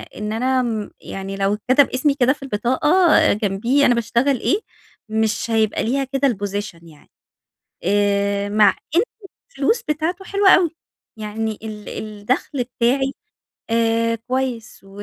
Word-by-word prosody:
إن 210 0 -4
أنا 255 +3 +1
امم، 220 -4 -3
يعني 195 0 -6
لو 195 +1 +1
إتكتب 255 +6 +3
إسمي 280 +3 +1
كده 260 -2 +3
في 285 - -14
البطاقة 275 - +3
جنبيه 215 +7 +1
أنا 245 - +4
باشتغل 235 +3 +1
إيه، 390 - +1 0.5
مش 220 +1 -1
هيبقى 220 -1 +1
ليها 270 +5 0
كده 270 +1 0
الposition 205 -4 -4
يعني. 155 -3 -18 0.7
آآ، 200 +1 +1
مع 210 0 +5 0.3
إن 350 - +6 0.5
الفلوس 450 - 0
بتاعته 330 +4 -2
حلوة 400 0 +3
أوي، 360 -2 +5 0.5
يعني 215 0 -4
ال 215 -1 -7
الدخل 215 +6 -3
بتاعي 255 +3 0 0.6
آآ، 230 0 +1
كويس 250 0 -4
و 195 - -17
230 Hz, 135 wpm, -20 LUFS, 210-270 Hz, 0.7 s, إن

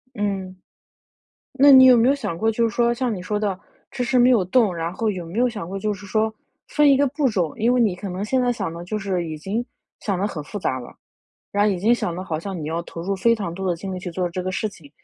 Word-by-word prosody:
嗯。 195 -3 -3 1.0
那 280 +2 +6
你 260 -1 +9
有 255 -1 +8
没 235 +2 +4
有 275 - +4
想 210 -12 -4
过 225 +3 +2
就 230 +1 +1
是 225 - -8
说 235 0 +2
像 240 -2 -1
你 185 - -6
说 210 +3 -2
的， 200 -3 -2 0.3
迟 260 -2 -3
迟 250 +1 +2
没 245 +1 +6
有 225 -7 +4
动， 200 0 +2
然 165 0 -3
后 220 +3 -1
有 180 -4 -5
没 175 +7 -6
有 250 +1 +4
想 210 -8 -6
过 195 +1 -4
就 210 +1 -1
是 200 0 -9
说 220 +2 0 0.4
分 295 -1 +4
一 275 - +6
个 285 +1 +3
步 285 +1 0
骤？ 180 -8 -1
因 235 +2 +2
为 250 - +2
你 215 -6 +2
可 195 +2 -7
能 185 +2 -4
现 260 +5 +1
在 245 -1 +2
想 195 -8 -4
得 170 +1 -7
就 215 +4 -3
是 190 -4 -2
已 155 - -5
经 200 +10 -3 0.4
想 195 -4 -2
得 195 - 0
很 155 -7 -5
复 205 - -6
杂 130 -8 -1
了， 120 - -11 0.6
然 205 0 +2
后 - - +3
已 185 - -3
经 215 +6 +3
想 175 -7 -3
的 180 - -5
好 160 -4 -3
像 190 +3 -5
你 150 - -4
要 165 +2 -2
投 165 -1 -8
入 195 +3 -2
非 230 +5 +3
常 200 -6 -4
多 190 +1 -3
的 175 - +1
精 190 +3 -6
力 - - -4
去 180 0 -6
做 180 +1 -2
这 180 +2 -4
个 185 +1 -3
事 215 - -1
情， 160 -8 -15
205 Hz, 310 characters per minute, -22 LUFS, 180-235 Hz, 1.0 s, 你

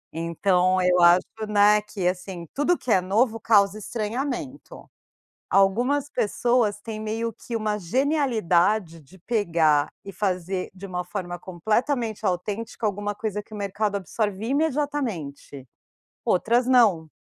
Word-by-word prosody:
Então, 180 +3 +1
eu 180 0 +3
acho, 175 +1 +6 0.3
né, 210 0 +5
que 205 -3 -3
assim: 180 -1 -4
tudo 290 +5 +1
que 250 - -4
é 190 - +4
novo, 220 +5 +1
causa 205 -2 +3
estranhamento. 250 +6 -5 0.7
Algumas 245 +9 +2
pessoas 225 -1 +1
têm 215 0 -6
meio 225 +2 -3
que 230 +2 -6
uma 215 -1 -1
genialidade 210 - +1
de 170 +6 -19
pegar 165 -9 +2 0.2
e 195 - -8
fazer, 185 -1 -2
de 190 +1 -11
uma 180 -1 -4
forma 175 -2 -5
completamente 220 - -1
autêntica, 205 +6 -3
alguma 205 0 -2
coisa 210 -1 -4
que 215 - -14
o - - -6
mercado 205 +1 -2
absorve 200 +2 -3
imediatamente. 260 - -2 0.6
Outras 235 +6 +2
não. 225 -11 +4
205 Hz, 130 wpm, -24 LUFS, 180-230 Hz, 0.7 s, acho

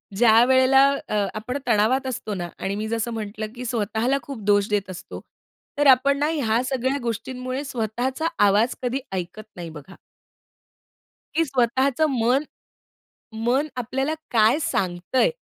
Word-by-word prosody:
ज्यावेळेला 255 +4 +5 0.2
अ, 210 -1 0
आपण 225 +5 -4
तणावात 240 +5 +2
असतो 220 -4 -4
ना 175 -3 -4
आणि 195 +1 -2
मी 215 +1 -3
जसं 230 +1 -2
म्हटलं 215 0 -5
की 250 - -7
स्वतःला 230 +3 0
खूप 270 -4 -8
दोष 205 0 +3
देत 205 -2 -1
असतो, 185 -1 -8 0.6
तर 290 -1 +3
आपण 275 +2 +5
ना 295 - +2
ह्या 235 -6 +1
सगळ्या 265 +1 0
गोष्टींमुळे 255 +3 -4
स्वतःचा 255 +3 -2 0.2
आवाज 210 +5 +2
कधी 250 +2 -1
ऐकत 185 +3 -5
नाही 175 -2 -7
बघा. 160 +4 -12 1.4
की 330 +1 +3
स्वतःचं 265 +2 +1
मन, 255 +2 +2 1.0
मन 265 +5 +2
आपल्याला 265 +5 -1 0.2
काय 230 +4 +4
सांगतंय, 180 - 0
240 Hz, 135 wpm, -23 LUFS, 215-265 Hz, 1.4 s, ज्यावेळेला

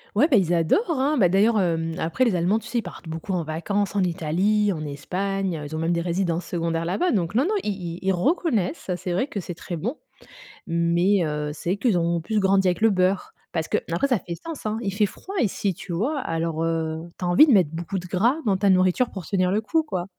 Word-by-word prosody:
Ouais, 290 +9 +4
bah, 240 - +6
ils 175 -3 +2
adorent, 175 - +2
hein. 290 0 +1
Bah, 190 -6 +5
d'ailleurs, 210 +4 +3
hem, 165 -2 0
après 170 +11 0
les 225 -7 +2
Allemands, 180 +6 +2
tu - - -8
sais, 240 - -2
ils - - +2
partent 175 -3 -10
beaucoup 165 +4 -4
en 175 -2 0
vacances 195 +6 -2
en 195 - +3
Italie, 185 +5 +1
en 155 -3 -4
Espagne, 185 +5 -2
heu, 150 - -6
ils 155 - -6
ont 155 - -3
même 165 +1 0
des 170 - +1
résidences 175 0 -1
secondaires 165 -1 -2
là-bas, 345 - +1
donc 185 -2 -1
non, 260 - +4
non, 410 +6 0
i - - -1 0.3
i - - -10
ils 190 0 +1
reconnaissent, 210 - 0
c'est 180 - -5
vrai 190 +11 0
que 200 - -4
c'est 175 0 -7
très 175 - -6
bon, 230 - -3 0.7
mais 170 +3 +2
heu, 150 -1 -2
c'est 175 +5 -2
qu'ils 225 -4 +2
ont 170 0 0
plus 215 +5 -1
grandi 195 -1 +3
avec 180 +3 0
le 225 - +5
beurre 185 -1 +1 0.2
parce 160 -2 -1
que - - +1
après 175 +12 +1
ça 250 -5 +2
fait 170 -2 -6
sens, 325 - -8
hein. 215 +1 -1
Il 195 - -2
fait 210 +2 +2
froid 385 - -8
ici, 200 -3 0
tu 180 - -9
vois? 250 - -1
Alors, 165 0 -2
heu, 160 -1 -1 0.2
tu 180 - -3
as - - 0
envie 175 - +7
de 285 - +2
mettre 185 -8 +5
beaucoup 170 +3 -4
de 180 - -9
gras 225 - +2
dans 195 -2 +3
ta 200 0 +2
nourriture 185 +6 +3
pour 190 -5 -7
tenir 185 -2 +1
le 210 - +1
coup, 320 +8 +1
quoi. 185 - -3
185 Hz, 250 wpm, -24 LUFS, 170-210 Hz, 0.7 s, envie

